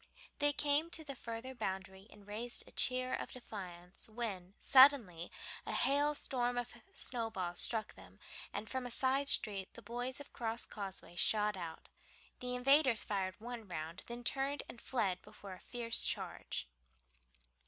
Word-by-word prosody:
They 290 Hz, 0 st, +4 dB
came 290 Hz, +3 st, +2 dB
to 325 Hz, -1 st, 0 dB
the 285 Hz, -2 st, -6 dB
further 240 Hz, +1 st, -6 dB
boundary 190 Hz, -3 st, -4 dB
and 205 Hz, -, -16 dB
raised 225 Hz, +4 st, 0 dB
a -, -, -13 dB
cheer 255 Hz, 0 st, +2 dB
of -, -, -3 dB
defiance, 185 Hz, -7 st, -7 dB
when 205 Hz, -5 st, -4 dB
suddenly 260 Hz, -, +6 dB, 0.3 s
a -, -, -4 dB
hail 290 Hz, +2 st, +3 dB
storm 245 Hz, -3 st, 0 dB
of 245 Hz, 0 st, -2 dB, 0.2 s
snowballs 220 Hz, -8 st, 0 dB
struck 220 Hz, -2 st, +2 dB
them, -, -, -16 dB, 0.3 s
and 220 Hz, -, -4 dB
from 260 Hz, +2 st, -3 dB
a -, -, -6 dB
side 265 Hz, +3 st, +3 dB
street 200 Hz, -7 st, +3 dB
the 235 Hz, -, -11 dB
boys 245 Hz, +5 st, -3 dB
of 285 Hz, -, -8 dB
the -, -, -21 dB
Crosscauseway 210 Hz, -6 st, -3 dB
shot 210 Hz, -1 st, +4 dB
out. 170 Hz, -3 st, -7 dB, 0.5 s
The 250 Hz, 0 st, -1 dB
invaders 260 Hz, -2 st, +5 dB
fired 190 Hz, -2 st, -1 dB
one 235 Hz, -1 st, -7 dB
round, 165 Hz, 0 st, -5 dB
then 240 Hz, 0 st, -6 dB
turned 275 Hz, +3 st, 0 dB
and 235 Hz, -, -10 dB
fled 195 Hz, -8 st, 0 dB
before 195 Hz, -2 st, -10 dB
a 185 Hz, -, -11 dB
fierce 235 Hz, -2 st, +1 dB
charge. -, -, -1 dB
235 Hz, 155 wpm, -36 LUFS, 195-260 Hz, 0.5 s, suddenly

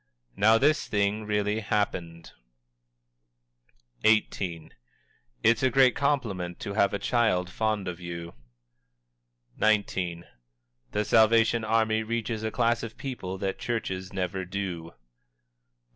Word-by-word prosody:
"Now, 110 Hz, +2 st, +5 dB
this 150 Hz, +6 st, +2 dB
thing 105 Hz, +1 st, 0 dB
really 105 Hz, 0 st, 0 dB
happened!" 90 Hz, -6 st, -2 dB, 1.7 s
XVIII. 95 Hz, -6 st, +1 dB, 0.7 s
"It's 115 Hz, -1 st, +4 dB
a 130 Hz, -, +3 dB
great 130 Hz, 0 st, +4 dB
compliment 105 Hz, -12 st, -1 dB
to 100 Hz, -, -4 dB
have 100 Hz, -1 st, +3 dB
a -, -, 0 dB
child 100 Hz, -6 st, +1 dB
fond 110 Hz, -3 st, -1 dB
of 90 Hz, -1 st, -5 dB
you." 85 Hz, -1 st, -7 dB, 1.3 s
XIX. 95 Hz, -5 st, +1 dB, 0.7 s
"The 105 Hz, -, 0 dB
Salvation 115 Hz, +1 st, +4 dB
Army 110 Hz, 0 st, +2 dB
reaches 115 Hz, 0 st, -3 dB
a 110 Hz, -, -1 dB
class 115 Hz, +1 st, +1 dB
of 115 Hz, -1 st, -7 dB
people 95 Hz, -9 st, -5 dB
that 95 Hz, 0 st, -3 dB
churches 95 Hz, -6 st, -3 dB
never 95 Hz, 0 st, -2 dB
do." 90 Hz, -3 st, -4 dB
XX. 85 Hz, -, -14 dB
105 Hz, 115 wpm, -27 LUFS, 95-115 Hz, 1.7 s, Now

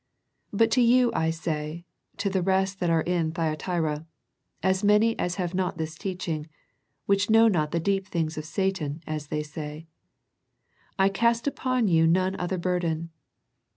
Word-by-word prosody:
But 225 Hz, +2 st, +2 dB
to 250 Hz, -, +4 dB
you 245 Hz, 0 st, +5 dB
I 160 Hz, -5 st, +1 dB
say, 160 Hz, 0 st, -4 dB, 0.3 s
to 200 Hz, -, -1 dB
the 190 Hz, -1 st, +1 dB
rest 190 Hz, +1 st, +1 dB
that 175 Hz, -, 0 dB
are 165 Hz, -1 st, +2 dB
in 170 Hz, -3 st, 0 dB
Thyatira, 160 Hz, -1 st, -2 dB, 0.6 s
as 190 Hz, +2 st, +1 dB
many 210 Hz, +2 st, +4 dB
as 180 Hz, 0 st, -1 dB
have 180 Hz, -2 st, -3 dB
not 185 Hz, -1 st, -1 dB
this 160 Hz, -1 st, -3 dB
teaching, 165 Hz, -3 st, -4 dB, 0.6 s
which 200 Hz, +1 st, +2 dB
know 225 Hz, +1 st, +6 dB
not 155 Hz, -8 st, +1 dB
the 170 Hz, -, -1 dB
deep 195 Hz, +3 st, 0 dB
things 160 Hz, -4 st, -2 dB
of 155 Hz, -, -5 dB
Satan, 165 Hz, -3 st, -2 dB
as 155 Hz, -2 st, -4 dB
they 150 Hz, +1 st, -2 dB
say; 150 Hz, +1 st, -7 dB, 1.1 s
I 195 Hz, 0 st, +4 dB
cast 235 Hz, +3 st, +1 dB
upon 255 Hz, -4 st, 0 dB
you 165 Hz, -3 st, +4 dB
none 185 Hz, +3 st, +2 dB
other 180 Hz, +1 st, -2 dB
burden. 170 Hz, -2 st, -1 dB
180 Hz, 160 wpm, -26 LUFS, 160-195 Hz, 1.1 s, know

